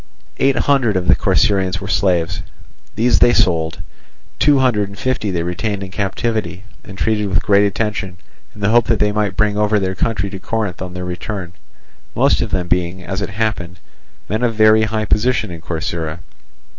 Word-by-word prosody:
Eight 135 0 +2
hundred 130 -8 +2
of 90 -1 -2
the - - +6
Corcyraeans 95 -3 +1
were 100 - -7
slaves; 90 -4 +1 0.5
these 120 +2 +3
they 120 - +5
sold; 80 -3 +1 0.6
two 145 +1 +4
hundred 115 -7 +2
and 100 - -11
fifty 130 -2 -1
they 85 -3 -1
retained 100 +3 -3
in 95 - -8
captivity, 100 -2 -2 0.2
and 95 - -11
treated 105 +2 0
with 95 - +1
great 100 0 +4
attention, 100 -3 -3 0.4
in 105 - -12
the 100 - +2
hope 120 0 +4
that 115 - +2
they 105 0 +2
might 105 -2 -1
bring 105 -1 +1
over 105 0 +2
their 95 -1 -1
country 100 0 -1
to 95 - -6
Corinth 105 -4 -3
on 90 -1 -6
their 90 0 -4
return; 90 0 -5 0.6
most - - +3
of - - -2
them 90 -2 -1
being, 90 +1 -1
as 95 +4 -4
it 100 - -3
happened, 100 -4 -3 0.5
men 110 +3 -2
of 120 -2 0
very 110 0 +5
high 110 0 -2
position 110 -1 +1
in 85 -1 -8
Corcyra. 80 -1 -3
100 Hz, 185 wpm, -18 LUFS, 90-110 Hz, 0.6 s, the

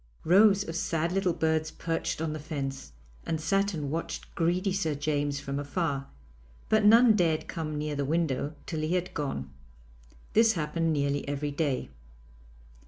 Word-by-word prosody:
Rows 200 +3 +5
of 165 - -5
sad 165 0 0
little 190 -1 +1
birds 160 -1 +1
perched 165 -1 -3
on 155 -2 -2
the 155 - -5
fence, 135 - -5 0.3
and 160 - -2
sat 195 +4 +1
and 145 -3 -3
watched 165 +2 -4
greedy 180 +3 +1
Sir 160 -6 0
James 145 -1 -1
from 140 0 -4
afar, 145 -2 -2 0.6
but 215 -1 +4
none 225 +2 +7
dared 165 -5 +1
come 155 -3 -4
near 150 0 -2
the 140 - -1
window 150 -1 -1
till 160 - -4
he 155 +3 0
had 180 0 -2
gone. 70 - -3 0.8
This 225 0 +5
happened 165 0 -1
nearly 140 -1 0
every 145 +1 -2
day. 140 - -1
160 Hz, 160 wpm, -28 LUFS, 145-175 Hz, 0.8 s, none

